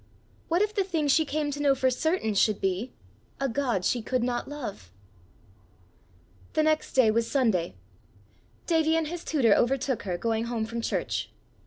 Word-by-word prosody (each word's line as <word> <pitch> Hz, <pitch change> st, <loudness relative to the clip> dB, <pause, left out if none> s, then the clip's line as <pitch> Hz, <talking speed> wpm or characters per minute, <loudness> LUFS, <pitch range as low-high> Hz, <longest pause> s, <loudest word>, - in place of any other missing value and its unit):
What 345 Hz, +4 st, +2 dB
if 425 Hz, 0 st, -2 dB
the 405 Hz, -3 st, +1 dB
thing 330 Hz, -6 st, -1 dB
she 315 Hz, +3 st, +4 dB
came 295 Hz, 0 st, -2 dB
to 285 Hz, -, -5 dB
know 280 Hz, -2 st, +4 dB
for 260 Hz, -1 st, +2 dB
certain 285 Hz, -, 0 dB
should 205 Hz, +1 st, +2 dB
be 195 Hz, +6 st, -1 dB, 0.5 s
a 275 Hz, -, 0 dB
God 240 Hz, -7 st, -1 dB
she 245 Hz, -, +1 dB
could 250 Hz, +2 st, -1 dB
not 240 Hz, -1 st, -2 dB
love! 240 Hz, -, -7 dB, 1.6 s
The 310 Hz, -, +2 dB
next 310 Hz, 0 st, +1 dB
day 245 Hz, -5 st, +5 dB
was 230 Hz, +1 st, 0 dB
Sunday. 220 Hz, -, +1 dB, 0.9 s
Davie 320 Hz, -1 st, +2 dB
and 320 Hz, -2 st, 0 dB
his 345 Hz, 0 st, -6 dB
tutor 250 Hz, -9 st, +3 dB
overtook 260 Hz, +1 st, +1 dB
her 180 Hz, -3 st, -3 dB
going 225 Hz, +3 st, -1 dB
home 235 Hz, -2 st, -2 dB
from 230 Hz, +1 st, -4 dB
church. -, -, -2 dB
260 Hz, 170 wpm, -27 LUFS, 225-310 Hz, 1.6 s, day